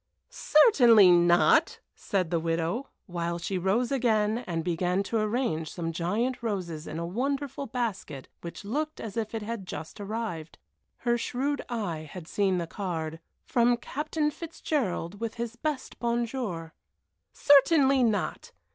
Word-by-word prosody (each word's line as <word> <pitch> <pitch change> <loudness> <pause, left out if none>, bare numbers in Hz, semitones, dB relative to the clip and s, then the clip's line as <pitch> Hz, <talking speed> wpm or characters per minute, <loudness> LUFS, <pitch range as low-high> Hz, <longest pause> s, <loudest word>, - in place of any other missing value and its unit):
"Certainly 245 - +6
not!" 175 0 +4
said 185 -4 -2
the 170 - +2
widow, 165 +10 -1 0.2
while 170 -1 -3
she 185 +2 -3
rose 210 +8 +1
again 225 -4 +2
and 165 -2 -2
began 180 +3 0
to 225 +2 -1
arrange 215 - -1
some 165 -2 -3
giant 210 +11 -1
roses 180 -8 -3
in 155 - -5
a 170 - -3
wonderful 275 +8 -2
basket 215 - -4
which 170 +3 -8
looked 305 +8 -2
as 220 -2 -6
if 225 -1 -3
it 220 - -3
had 215 -3 -5
just 160 +2 -7
arrived 200 -7 -5 0.5
her 240 0 +2
shrewd 265 +4 -1
eye 175 -10 -3
had 180 -4 -9
seen 195 -2 +1
the 170 - -1
card, 165 -4 -4 0.3
"From 240 0 +3
Captain 300 +4 -2
Fitzgerald, 260 - -3
with 230 -1 -4
his 235 0 -4
best 295 +2 -4
bonjour." 235 -8 -2 0.6
"Certainly 275 -1 +5
not! 215 -5 -1
210 Hz, 140 wpm, -28 LUFS, 175-245 Hz, 0.6 s, Certainly